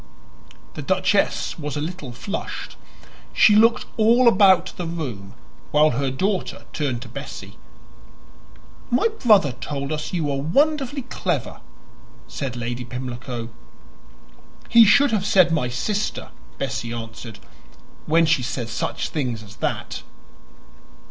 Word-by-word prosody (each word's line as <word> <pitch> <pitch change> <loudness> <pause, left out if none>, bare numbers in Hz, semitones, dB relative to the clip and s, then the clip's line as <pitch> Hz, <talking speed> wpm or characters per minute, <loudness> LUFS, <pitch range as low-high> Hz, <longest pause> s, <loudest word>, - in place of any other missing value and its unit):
The - - -6
duchess - - +1
was 150 -1 -4
a - - -1
little 155 -4 -5
flushed; 130 - -6 0.6
she 210 - +6
looked 230 +2 +4
all 235 +3 +5
about 190 -4 +5
the 175 - -4
room, 120 -12 -6 0.3
while 150 +1 +4
her 135 +3 -1
daughter 190 +8 -2
turned 130 -6 -2
to - - -11
Bessie. - - -9 1.3
"My 250 - +2
brother 205 - +5
told 140 +2 -4
us 150 -1 -3
you 175 -3 -1
were 140 -2 -1
wonderfully 280 - +1
clever," 260 - -3 0.7
said 135 -4 -5
Lady 120 +1 -4
Pimlico. 125 -1 -6 1.2
"He 230 -1 +8
should 280 +6 +5
have 210 -4 +1
said 185 -4 +4
my 155 -6 +1
sister," 205 - -2 0.3
Bessie 115 - -3
answered 115 -1 -7 0.7
"when 165 +2 +4
she 155 -4 +2
says 120 -1 -4
such - - -3
things 125 -7 -3
as 105 0 -14
that." - - -3
150 Hz, 125 wpm, -22 LUFS, 125-205 Hz, 1.3 s, He